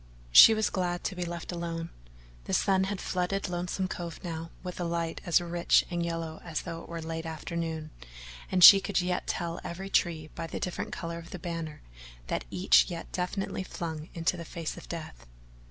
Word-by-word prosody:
She 220 Hz, -, +10 dB
was 215 Hz, -1 st, +1 dB
glad 175 Hz, -2 st, -1 dB
to 190 Hz, -, -2 dB
be 180 Hz, -1 st, -3 dB
left 170 Hz, 0 st, -5 dB
alone. 170 Hz, -1 st, -4 dB, 0.5 s
The -, -, 0 dB
sun 190 Hz, -1 st, +3 dB
had 195 Hz, 0 st, -3 dB
flooded 185 Hz, +2 st, -1 dB
Lonesome 180 Hz, +1 st, -2 dB
Cove 170 Hz, -3 st, -6 dB
now 165 Hz, -2 st, -5 dB
with 180 Hz, -1 st, -6 dB
a -, -, -1 dB
light 170 Hz, -1 st, -2 dB
as 175 Hz, -, +5 dB
rich 175 Hz, 0 st, +2 dB
and 175 Hz, -1 st, -1 dB
yellow 165 Hz, -1 st, -4 dB
as 165 Hz, -2 st, -3 dB
though 165 Hz, 0 st, -6 dB
it -, -, -13 dB
were 170 Hz, -1 st, -5 dB
late 165 Hz, 0 st, -4 dB
afternoon, 160 Hz, -1 st, -4 dB, 0.6 s
and 185 Hz, -1 st, +3 dB
she 195 Hz, +2 st, +12 dB
could 200 Hz, -2 st, 0 dB
yet 180 Hz, 0 st, -1 dB
tell 170 Hz, 0 st, -2 dB
every 190 Hz, +3 st, -6 dB
tree 160 Hz, -3 st, +1 dB
by 165 Hz, -, -5 dB
the -, -, -5 dB
different 180 Hz, -, -3 dB
colour 170 Hz, 0 st, -5 dB
of 170 Hz, -, -11 dB
the -, -, -6 dB
banner 165 Hz, -3 st, -5 dB, 0.5 s
that -, -, -2 dB
each 180 Hz, +2 st, +5 dB
yet 170 Hz, -2 st, -6 dB
defiantly 190 Hz, +2 st, -2 dB
flung 160 Hz, -3 st, -5 dB
into 165 Hz, +1 st, 0 dB
the 170 Hz, -, -6 dB
face 165 Hz, 0 st, -5 dB
of -, -, -12 dB
death. 155 Hz, -, -7 dB
170 Hz, 195 wpm, -29 LUFS, 165-180 Hz, 0.6 s, she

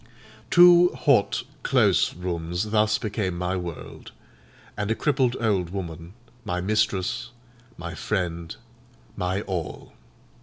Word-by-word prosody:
Two 175 Hz, 0 st, +8 dB
hot, 130 Hz, -9 st, +2 dB, 0.2 s
close -, -, +2 dB
rooms 90 Hz, +3 st, -3 dB
thus 110 Hz, 0 st, +3 dB
became 105 Hz, -5 st, -3 dB
my 90 Hz, +1 st, -1 dB
world; 90 Hz, -3 st, -7 dB, 0.6 s
and 105 Hz, 0 st, -3 dB
a 110 Hz, -, +1 dB
crippled 130 Hz, -3 st, +1 dB
old 100 Hz, -7 st, 0 dB
woman, 85 Hz, -2 st, -6 dB, 0.3 s
my 90 Hz, -4 st, -2 dB
mistress, 110 Hz, +3 st, 0 dB, 0.5 s
my 85 Hz, 0 st, -6 dB
friend, 85 Hz, -5 st, -3 dB, 0.6 s
my 90 Hz, +2 st, -1 dB
all. 90 Hz, -6 st, -5 dB
95 Hz, 110 wpm, -25 LUFS, 90-110 Hz, 0.6 s, Two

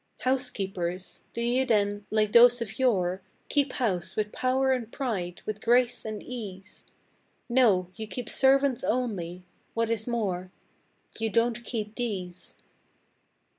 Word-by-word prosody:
Housekeepers? 195 Hz, -9 st, -2 dB
Do 235 Hz, -, -4 dB
you 245 Hz, +2 st, +2 dB
then, 205 Hz, -4 st, +1 dB
like 215 Hz, -1 st, +1 dB
those 245 Hz, +1 st, +8 dB
of 225 Hz, 0 st, -5 dB
yore, 190 Hz, -7 st, +2 dB, 0.3 s
Keep 280 Hz, -3 st, +1 dB
house 185 Hz, -8 st, -1 dB
with 210 Hz, -1 st, -1 dB
power 265 Hz, +1 st, +1 dB
and 240 Hz, -3 st, -1 dB
pride, 190 Hz, -10 st, -3 dB
with 215 Hz, 0 st, -4 dB
grace 245 Hz, 0 st, +3 dB
and 215 Hz, -1 st, -5 dB
ease? 200 Hz, -6 st, -8 dB, 0.6 s
No, 215 Hz, -8 st, +3 dB
you 220 Hz, +1 st, -6 dB
keep 240 Hz, +1 st, -5 dB
servants 270 Hz, -1 st, +3 dB
only! 185 Hz, -8 st, -2 dB, 0.3 s
What 230 Hz, 0 st, +1 dB
is 220 Hz, 0 st, -1 dB
more 190 Hz, -6 st, -2 dB, 0.7 s
You 225 Hz, 0 st, 0 dB
don't 230 Hz, +1 st, +1 dB
keep 215 Hz, -3 st, -4 dB
these! 190 Hz, -7 st, -5 dB
225 Hz, 130 wpm, -28 LUFS, 195-245 Hz, 0.7 s, those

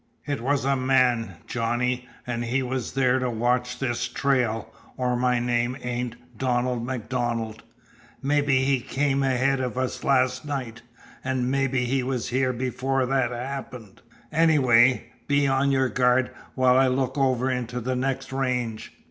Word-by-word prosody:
It 145 Hz, -4 st, -2 dB
was 135 Hz, +2 st, 0 dB
a 140 Hz, 0 st, +3 dB
man, 130 Hz, -3 st, +2 dB
Johnny, 125 Hz, +1 st, -1 dB, 0.2 s
an' 120 Hz, -1 st, -3 dB
he 125 Hz, +3 st, 0 dB
was 130 Hz, -1 st, -3 dB
there 130 Hz, -1 st, +2 dB
to 125 Hz, -1 st, -1 dB
watch 125 Hz, +2 st, 0 dB
this 120 Hz, -3 st, -1 dB
trail, 125 Hz, -5 st, 0 dB, 0.2 s
or 125 Hz, -1 st, 0 dB
my 125 Hz, 0 st, +2 dB
name 120 Hz, +1 st, 0 dB
ain't 125 Hz, -1 st, -3 dB, 0.2 s
Donald 125 Hz, 0 st, 0 dB
MacDonald. 120 Hz, -2 st, -3 dB, 0.6 s
Mebby 145 Hz, -2 st, +2 dB
he 135 Hz, -1 st, +2 dB
came 140 Hz, +2 st, 0 dB
ahead 135 Hz, 0 st, +2 dB
of 125 Hz, -1 st, -3 dB
us 130 Hz, -1 st, -2 dB
last 130 Hz, -2 st, +2 dB
night, 130 Hz, -6 st, -5 dB, 0.4 s
an' 130 Hz, -1 st, -1 dB
mebby 135 Hz, -2 st, +1 dB
he 130 Hz, +2 st, +1 dB
was 125 Hz, -1 st, -2 dB
here 130 Hz, +1 st, +1 dB
before 130 Hz, +1 st, -1 dB
that 130 Hz, -1 st, +1 dB
happened. 125 Hz, -4 st, -7 dB, 0.3 s
Anyway, 130 Hz, -6 st, +4 dB, 0.2 s
be 145 Hz, 0 st, +3 dB
on 135 Hz, +1 st, +2 dB
your 130 Hz, -1 st, +2 dB
guard 125 Hz, +2 st, +2 dB, 0.2 s
while 130 Hz, 0 st, +4 dB
I 135 Hz, -, +5 dB
look 130 Hz, 0 st, 0 dB
over 130 Hz, -2 st, +1 dB
into 125 Hz, -1 st, -3 dB
the 130 Hz, +2 st, -2 dB
next 135 Hz, +1 st, -2 dB
range." 125 Hz, -4 st, -2 dB
125 Hz, 150 wpm, -25 LUFS, 120-135 Hz, 0.6 s, I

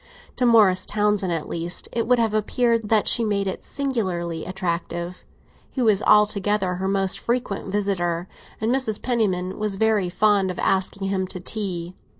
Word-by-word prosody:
To 250 Hz, -, +2 dB
Morris 205 Hz, -6 st, +4 dB
Townsend, 210 Hz, -3 st, +1 dB
at 165 Hz, -3 st, -2 dB
least, 170 Hz, +1 st, -3 dB
it 230 Hz, -1 st, -1 dB
would 250 Hz, 0 st, +4 dB
have 225 Hz, -2 st, +1 dB
appeared 230 Hz, +1 st, +1 dB
that 220 Hz, -2 st, +3 dB
she 235 Hz, -, +4 dB
made 205 Hz, -2 st, 0 dB
it 190 Hz, -, -4 dB
singularly 185 Hz, -, -3 dB
attractive. 175 Hz, -1 st, -4 dB, 0.5 s
He 260 Hz, -, -2 dB
was 215 Hz, -3 st, +3 dB
altogether 205 Hz, -3 st, +2 dB
her 190 Hz, +1 st, -2 dB
most 195 Hz, -1 st, 0 dB
frequent 235 Hz, -4 st, -2 dB
visitor, 180 Hz, -4 st, -1 dB, 0.3 s
and 220 Hz, +3 st, 0 dB
Mrs. 255 Hz, -6 st, 0 dB
Penniman 195 Hz, -7 st, -1 dB
was 210 Hz, -2 st, -1 dB
very 210 Hz, -3 st, +1 dB
fond 200 Hz, +1 st, +2 dB
of 180 Hz, -, -5 dB
asking 195 Hz, +1 st, 0 dB
him 190 Hz, -1 st, -1 dB
to 185 Hz, -, -7 dB
tea. 180 Hz, -3 st, -3 dB
200 Hz, 160 wpm, -23 LUFS, 185-220 Hz, 0.5 s, Morris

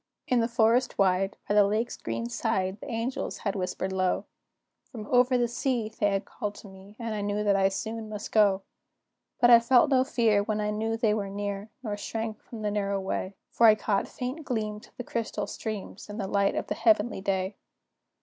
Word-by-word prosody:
In 250 Hz, -, +3 dB
the 230 Hz, -, +2 dB
forest 235 Hz, +1 st, +2 dB
wide, 195 Hz, 0 st, +2 dB
by -, -, +1 dB
the 205 Hz, 0 st, +7 dB
lake's 215 Hz, +4 st, 0 dB
green 115 Hz, +1 st, -4 dB
side, 190 Hz, -, -1 dB
The -, -, -7 dB
angels 230 Hz, +3 st, -3 dB
had 200 Hz, -, 0 dB
whispered 190 Hz, 0 st, -2 dB
low; 185 Hz, -1 st, 0 dB, 0.7 s
From 225 Hz, -5 st, -7 dB
"over 250 Hz, +2 st, +4 dB
the 240 Hz, -1 st, +2 dB
sea" 240 Hz, -2 st, -1 dB
they 210 Hz, -2 st, 0 dB
had 195 Hz, 0 st, -1 dB
called 205 Hz, 0 st, -5 dB
to -, -, -11 dB
me, 190 Hz, +1 st, -14 dB
And 230 Hz, -2 st, -4 dB
I 210 Hz, -, -2 dB
knew 205 Hz, +1 st, -1 dB
that 205 Hz, -1 st, +3 dB
I 195 Hz, 0 st, +4 dB
soon 220 Hz, +3 st, -4 dB
must 210 Hz, -1 st, -6 dB
go; 200 Hz, -3 st, +4 dB, 0.8 s
But 240 Hz, -, +6 dB
I 235 Hz, -, +10 dB
felt 245 Hz, +4 st, +4 dB
no 260 Hz, -1 st, +5 dB
fear 225 Hz, -5 st, +2 dB
when 215 Hz, +1 st, -2 dB
I 210 Hz, 0 st, 0 dB
knew 220 Hz, +1 st, -1 dB
they 225 Hz, -2 st, +2 dB
were 205 Hz, -2 st, -2 dB
near, 200 Hz, +1 st, -4 dB
Nor 210 Hz, -3 st, -3 dB
shrank 220 Hz, +1 st, -4 dB
from 225 Hz, -3 st, -9 dB
the 210 Hz, -, 0 dB
narrow 200 Hz, -1 st, 0 dB
way, 190 Hz, 0 st, -3 dB, 0.2 s
For 230 Hz, -, +5 dB
I 215 Hz, -, +8 dB
caught 205 Hz, -2 st, 0 dB
faint 255 Hz, +6 st, -5 dB
gleams 215 Hz, -4 st, -3 dB
of -, -, -29 dB
the 245 Hz, -, -4 dB
crystal 225 Hz, -3 st, -3 dB
streams, 210 Hz, -2 st, -6 dB
And 205 Hz, +2 st, -6 dB
the 200 Hz, -, -1 dB
light 200 Hz, 0 st, +1 dB
of -, -, -1 dB
the -, -, -2 dB
heavenly 220 Hz, -2 st, +2 dB
day. 190 Hz, 0 st, -1 dB
210 Hz, 210 wpm, -28 LUFS, 200-230 Hz, 0.8 s, I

